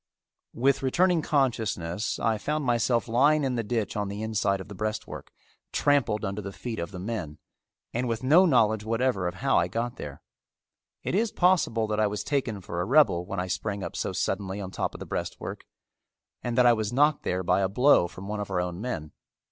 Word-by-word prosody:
With 135 +3 +2
returning 175 +6 +2
consciousness 110 - 0
I 110 -2 0
found 150 +4 -2
myself 120 -1 +1
lying 145 +6 +3
in 130 -2 0
the 120 - 0
ditch 110 -2 -2
on 105 -1 -1
the 100 +2 -5
inside 105 -3 0
of 95 - -8
the 105 - -9
breastwork, 110 +1 -5 0.4
trampled 135 -7 +2
under 100 +2 -3
the 100 0 -6
feet 115 +3 -6
of 85 - -3
the 95 - -8
men, 90 -6 -4 0.6
and 125 +2 -1
with 115 +1 -2
no 165 +8 +6
knowledge 110 -7 +3
whatever 115 -4 0
of 90 - -4
how 95 - +2
I - - +1
got 120 +1 -3
there. 70 -1 -8 0.8
It - - -2
is 215 +3 +1
possible 175 -11 +2
that 105 0 -2
I 105 - +4
was 105 0 -3
taken 120 -8 -1
for 85 0 -4
a - - -1
rebel 110 - +4
when 100 - -3
I 90 - -1
sprang 100 +2 -3
up 85 - -6
so - - -2
suddenly 95 0 -2
on 95 -2 -6
top - - -3
of - - -8
the - - -6
breastwork - - -5 0.8
and 120 0 -3
that 125 - +6
I 120 - +7
was 110 -2 -2
knocked 145 +4 +3
there 90 +1 -1
by 90 +2 +2
a 95 - +1
blow 125 -3 +4
from 95 +2 -10
one 105 0 -3
of 105 - -4
our 95 -2 0
own 90 +1 -3
men. 80 -11 -4
110 Hz, 210 wpm, -27 LUFS, 95-125 Hz, 0.8 s, I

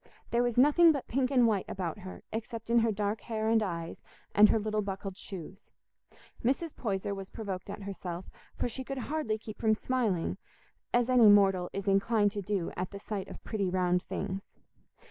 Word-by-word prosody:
There 235 - +3
was 245 -1 0
nothing 300 +6 +7
but 280 -4 -3
pink 255 0 +1
and 255 -3 +4
white 210 -4 +1
about 180 -1 -3
her, 185 -1 -9
except 225 0 -5
in 235 - +6
her 230 -1 +2
dark 210 +1 -1
hair 220 -1 -2
and 225 0 +4
eyes 170 -4 -4 0.3
and 210 +1 +7
her - - +4
little 215 0 -1
buckled 195 -1 -5
shoes. 190 0 -9 0.7
Mrs. 275 +6 0
Poyser 200 -3 -2
was 195 -1 -7
provoked 195 -3 -5
at 200 - -6
herself, 180 -2 -5 0.3
for - - -1
she 260 +2 -5
could 270 +1 -5
hardly 260 -4 -1
keep 215 -1 -10
from 220 -1 +3
smiling, 220 -8 -1 0.5
as 240 0 +3
any 245 -4 +7
mortal 195 -3 +5
is 195 0 -5
inclined 205 +1 +3
to 205 -1 -4
do 195 -3 -2
at 180 0 -3
the 200 - -8
sight 200 -1 -4
of - - -10
pretty 200 -4 -1
round 180 -1 +2
things. 195 +1 -4
210 Hz, 190 wpm, -30 LUFS, 195-235 Hz, 0.7 s, nothing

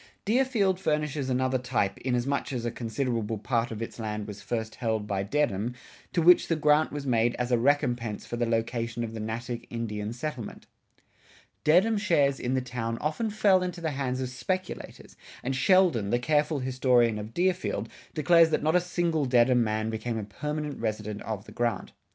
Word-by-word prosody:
Deerfield 220 -5 +2
furnishes 150 -4 -1
another 130 0 +1
type, 120 -6 -1
inasmuch 130 +3 -1
as 120 -3 -3
a 120 - -1
considerable 115 -2 -2
part 115 +2 0
of 115 0 -4
its 115 - -8
land 105 -1 -3
was 105 -1 -8
first 110 -2 -3
held 110 -3 -1
by 100 -2 -1
Dedham, 120 -1 0 0.4
to 170 - +1
which 175 +1 +6
the 165 - +1
grant 150 0 +3
was 145 -1 -5
made 120 -2 +2
as 125 0 -2
a 120 - +4
recompense 120 -5 +1
for - - -5
the 120 0 0
location 115 +1 -1
of 115 -1 -5
the 110 - -5
Natick 115 +2 -4
Indian 105 -3 -4
reservation. 120 0 -5 1.0
Dedham 190 +8 +4
shares 145 -9 +2
in 125 +2 -1
the 130 - +1
town 115 -2 -3
often 155 - -1
fell 205 -3 +3
into 180 -1 -3
the 160 -2 -2
hands 135 -2 -2
of 130 - -2
speculators, 185 +9 -5 0.3
and 135 +2 -1
Sheldon, 155 - +3
the 120 - +2
careful 150 +4 +1
historian 125 -3 +2
of 105 +2 -8
Deerfield, 185 +1 0 0.3
declares 165 +1 +5
that 160 - 0
not 155 +2 +2
a 180 - +5
single 170 -4 0
Dedham 125 -1 +4
man 110 0 -1
became 115 +1 -3
a 110 - -3
permanent 150 +8 -4
resident 105 -2 -3
of 105 -2 -5
the - - -12
grant. 120 -5 -2
125 Hz, 180 wpm, -28 LUFS, 115-150 Hz, 1.0 s, which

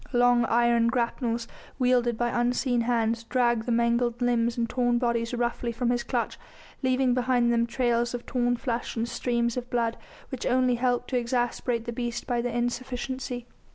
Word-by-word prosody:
Long 245 -1 +4
iron 235 0 +3
grapnels, 235 -1 -1 0.3
wielded 245 -3 +2
by 240 +1 +1
unseen 245 +1 +1
hands, 230 -1 +1
dragged 240 -1 +1
the - - 0
mangled 235 0 +1
limbs 240 -1 +1
and 235 -1 0
torn 245 0 +1
bodies 235 -1 0
roughly 240 0 -1
from 240 +1 0
his 245 -1 0
clutch, - - -2 0.4
leaving 255 -1 +2
behind 245 -1 +2
them 235 0 +2
trails 240 0 0
of 240 - -7
torn 245 -1 0
flesh 240 -2 -3
and 230 0 -1
streams 235 -1 -1
of 250 0 -4
blood, 230 -1 0 0.3
which 260 -3 -4
only 255 0 +3
helped 245 +1 0
to 250 - +2
exasperate 240 -1 -1
the 235 - -4
beast 240 0 -3
by 240 -2 0
their 245 0 -2
insufficiency. 245 +1 -3
240 Hz, 170 wpm, -27 LUFS, 235-245 Hz, 0.4 s, Long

